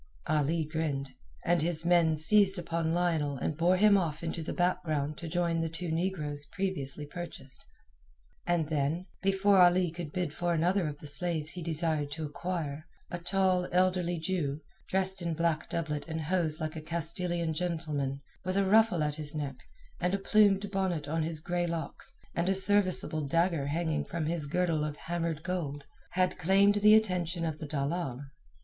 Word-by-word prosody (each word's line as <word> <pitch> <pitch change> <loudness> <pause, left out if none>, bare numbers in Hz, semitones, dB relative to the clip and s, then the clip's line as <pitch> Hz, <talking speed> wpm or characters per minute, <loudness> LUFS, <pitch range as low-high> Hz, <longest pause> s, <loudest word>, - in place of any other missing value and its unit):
Ali 155 +2 +1
grinned, 150 -3 -2 0.3
and 175 -2 +3
his 165 0 +2
men 170 -3 +4
seized 195 +4 +4
upon 165 -2 -1
Lionel 165 -5 0
and 150 - -2
bore 175 +4 +3
him 205 0 +6
off 165 -3 -3
into 165 0 -3
the 160 - -4
background 155 -5 0
to 170 - -6
join 170 0 0
the 165 - -1
two 165 +1 -4
negroes 155 -4 -2
previously 180 -8 -2
purchased. 145 -4 -5 0.8
And 175 -3 +1
then, 155 +4 0 0.2
before 195 0 +3
Ali 175 -1 +5
could 165 -2 -6
bid 175 -4 -2
for 175 0 0
another 175 +2 +2
of 145 -1 -5
the 150 - -12
slaves 155 +1 0
he 180 - -5
desired 160 -2 0
to 160 0 -4
acquire, 155 -1 -4 0.2
a 175 - -3
tall, 185 0 +1
elderly 180 -1 +2
Jew, 155 -4 -2 0.3
dressed 190 0 -1
in 170 -2 -2
black 165 -1 0
doublet 155 -3 -3
and 160 -1 -3
hose 160 -1 0
like 155 0 -3
a 160 - -5
Castilian 170 +1 -1
gentleman, 155 -5 -2 0.2
with 185 +1 -1
a 200 - +3
ruffle 215 -4 +4
at 150 0 -2
his 150 0 +1
neck, 140 -3 -3 0.4
a 180 - +1
plumed 200 0 +3
bonnet 185 -6 -1
on 160 +2 -1
his 160 -1 -3
grey 175 +1 -1
locks, 165 -3 -4 0.2
and 170 +2 0
a 195 - +2
serviceable 190 -6 +3
dagger 165 -1 +1
hanging 160 +1 -1
from 165 -2 -3
his 160 -2 -1
girdle 165 -1 +1
of 150 -1 -3
hammered 165 -2 -3
gold, 150 -6 -3 0.3
had 185 0 +1
claimed 195 +4 +4
the 210 +1 +8
attention 180 -5 +1
of 155 -2 -3
the 155 - -6
dalal. 140 -2 -2
170 Hz, 170 wpm, -30 LUFS, 155-180 Hz, 0.8 s, the